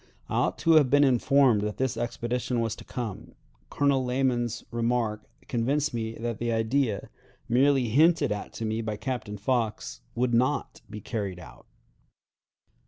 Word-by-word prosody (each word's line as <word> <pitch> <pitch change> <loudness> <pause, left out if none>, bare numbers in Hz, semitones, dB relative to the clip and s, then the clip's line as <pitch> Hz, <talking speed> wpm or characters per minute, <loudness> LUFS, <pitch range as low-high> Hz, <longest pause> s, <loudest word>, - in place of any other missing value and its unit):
I - - -5
ought - - +1
to 165 - +3
have 145 -4 +4
been 145 +2 +5
informed 130 -3 +4
that 105 0 -3
this 130 -1 0
expedition 120 +1 -2
was 115 -2 -1
to - - -10
come. 115 -6 -6 0.3
Colonel 140 -2 +2
Lamon's 125 -2 0
remark 115 -2 -1 0.2
convinced 135 +5 0
me 115 -1 -3
that 115 -1 -4
the 120 0 -1
idea, 115 0 0 0.4
merely 130 0 +3
hinted 155 +2 +4
at 105 0 -4
to 115 - -4
me 110 +1 -1
by 110 -2 -3
Captain 120 -6 -4
Fox, 115 0 -2
would 120 0 0
not 130 +5 0
be 105 0 -8
carried 100 -4 -4
out. 65 -8 -14
120 Hz, 155 wpm, -27 LUFS, 110-130 Hz, 0.4 s, been